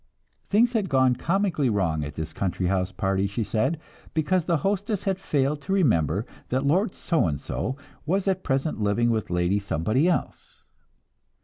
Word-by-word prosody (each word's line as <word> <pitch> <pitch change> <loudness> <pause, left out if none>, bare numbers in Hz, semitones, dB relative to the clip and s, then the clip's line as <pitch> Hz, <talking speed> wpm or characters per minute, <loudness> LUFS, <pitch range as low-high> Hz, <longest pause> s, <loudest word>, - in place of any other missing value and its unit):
Things 235 +4 +3
had 210 -5 0
gone 130 -2 +4
comically 170 -2 +1
wrong 85 -8 0
at 75 - -6
this 80 0 -5
country 95 -1 -2
house 95 0 0
party, 95 +1 0
she 105 +4 -2
said, 130 +10 0 0.4
because 160 +2 +1
the 170 -2 +2
hostess 205 +1 0
had 190 -1 -1
failed 145 -4 0
to 190 +7 -2
remember 105 - +2 0.2
that 130 +2 0
Lord 180 +7 +2
So 165 - +1
and 70 -3 -2
so 130 +3 -3 0.3
was 195 +4 +1
at 190 -1 0
present 135 -3 -1
living 115 +3 +2
with 110 -2 -1
Lady 90 +3 +1
Somebody 100 - +1
else. 175 - -3
130 Hz, 170 wpm, -25 LUFS, -, 0.4 s, gone